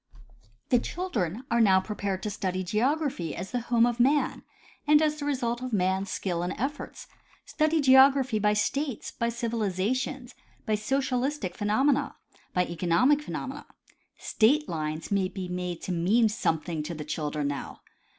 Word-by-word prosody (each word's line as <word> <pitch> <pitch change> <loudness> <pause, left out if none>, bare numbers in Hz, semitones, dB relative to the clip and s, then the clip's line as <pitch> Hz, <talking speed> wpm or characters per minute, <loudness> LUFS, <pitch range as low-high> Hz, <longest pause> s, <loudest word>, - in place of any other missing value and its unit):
The 245 - +4
children 235 - -3
are 235 0 +3
now 190 -4 +5
prepared 195 -1 -4
to 210 - -2
study 185 -2 -2
geography 235 - -1
as 185 +2 -6
the 250 - -1
home 235 -1 +5
of 240 0 -1
man 280 +4 +2 0.5
and 300 0 +6
as 305 -1 +1
the 290 - -4
result 245 -4 -1
of 255 -2 -5
man's 190 0 +1
skill 175 -3 -2
and 175 +1 -2
efforts; 280 +5 -4 0.4
study 310 0 +1
geography 265 -3 +5
by 210 0 +3
states, 260 +5 -1
by 235 - -1
civilization, 235 +2 -2 0.4
by 215 - 0
socialistic 255 -2 -1
phenomena, 260 +7 +1 0.4
by 180 0 +1
economic 175 - +2
phenomena. - - -6 0.5
State 285 +7 +2
lines 155 +1 -4
may 195 -2 +2
be 185 -1 -6
made 180 -1 -4
to - - -3
mean 200 +7 +3
Some 165 -6 0
thing 160 -1 -4
to 160 +3 -5
the 150 -1 -6
children 150 -1 -2
now. 140 - -6
215 Hz, 155 wpm, -27 LUFS, 180-265 Hz, 0.5 s, and